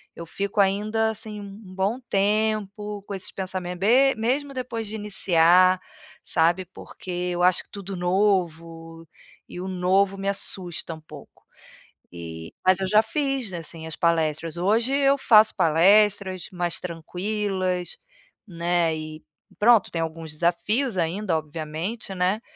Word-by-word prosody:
eu 170 - -8
fico 200 +4 -3
ainda, 215 +3 +2
assim, 215 -1 -7
um 200 -1 -11
bom 200 +6 0
tempo 210 0 0
com 200 - -7
esses 190 -1 -3
pensamento 185 -2 -4
be 260 +6 +4
mesmo 270 +5 -1
depois 245 -4 -4
de 220 - -5
iniciar, 185 -3 +4 0.4
sabe, 170 +3 +1
porque 185 +1 -11
eu 175 0 -1
acho 180 0 +3
tudo 200 -1 -7
novo 170 -3 -1 0.4
e 180 - -8
o 190 - -5
novo 190 +2 +1
me 195 0 -4
assusta 180 -4 -3
um - - -13
pouco. 155 - -14 0.7
E 80 -1 -8
mas 185 -1 +5
eu 190 - 0
já 215 +1 +6
fiz, 270 -3 -2
assim, 165 -1 -7
as 160 - -5
palestras. 165 -1 0
Hoje 225 +8 +1
eu 275 0 +3
faço 220 -4 +5
palestras 190 +3 +3
mais 175 -2 -2
tranquilas, 185 +1 -3 0.5
né, 170 -2 0
e 155 0 -8 0.3
pronto. 225 -1 +5
Tem 165 - -2
alguns 160 0 -5
desafios 190 - 0
ainda, 175 +1 0
obviamente, 160 +7 -5
né, 185 +4 0
185 Hz, 135 wpm, -24 LUFS, 170-210 Hz, 0.7 s, já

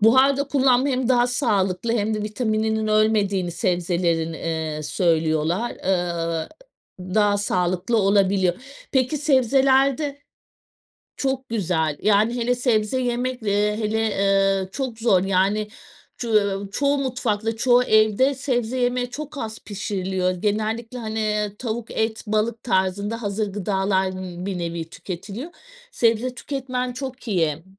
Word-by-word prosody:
Buharda 260 +5 +5
kullanma 265 -1 +3
hem 255 -2 0
daha 245 -1 +4
sağlıklı 220 -5 0
hem 220 -1 0
de 215 - -2
vitamininin 220 0 -1
ölmediğini 210 -4 +2
sebzelerin, 170 -1 0
eee, 160 -2 -3
söylüyorlar, 165 +5 +1
eee, 170 -3 -1 0.5
daha 205 +2 +1
sağlıklı 185 +2 0
olabiliyor. 195 -2 +3 0.4
Peki 260 +2 +2
sebzelerde 275 +1 +2 0.9
Çok 265 -1 -2
güzel 175 -8 0
yani 215 +3 +3
hele 245 0 +1
sebze 245 -1 +1
yemekle, 245 -2 -2
eee, 210 +1 +1
hele, 220 0 -1
eee, 195 -1 +2
çok 260 -3 -4
zor 210 -6 +3
yani 195 +3 +1 0.5
ç 240 - -4 0.5
çoğu 280 +4 +1
mutfakta 225 -4 -1
çoğu 245 +1 +4
evde 220 +4 +3
sebze 255 -2 -1
yemeği 245 0 0
çok 295 +3 -7
az 220 -2 -5
pişiriliyor 190 -2 -2
genellikle 220 +5 -2
hani, 220 -2 -4
eee, 210 -1 -1
tavuk 230 -1 -4
et 220 0 -1
balık 215 +2 0
tarzında 200 +2 0
hazır 205 0 -2
gıdalar 190 -1 0
n 180 -1 -6
bir 195 -2 -3
nevi 170 -1 -4
tüketiliyor 200 - -7 0.4
sebze 235 - +1
tüketmen 255 -2 -3
çok 260 -1 -7
iyi. 165 -5 0
215 Hz, 125 wpm, -23 LUFS, 190-245 Hz, 0.9 s, Buharda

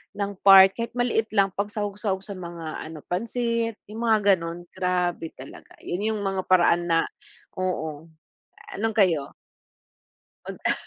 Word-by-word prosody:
ng 200 0 -2 0.2
part 190 0 +10
kahit 230 0 -4
maliit 240 -2 +1
lang 195 -1 +3
pang 200 +2 -2
sahog-sahog 205 -2 -3
sa 200 -1 -7
mga 170 -3 -7
ano 160 -1 -9
pansit, 230 +3 -1
'yung 215 +2 -8
mga 205 -3 +5
gano'n. 170 0 -7
Grabe 180 -2 -1
talaga, - - -13
'yun 185 +4 -3
'yung 210 -2 -3
mga 195 -1 -1
paraan 175 -1 +4
na 165 -1 +3 0.6
oo. 160 -4 -3 0.6
Ah - - -8
nung 225 -1 0
kayo? 170 -9 +2 1.1
Mag - - -7
ah - - +4
190 Hz, 150 wpm, -25 LUFS, 175-210 Hz, 1.1 s, part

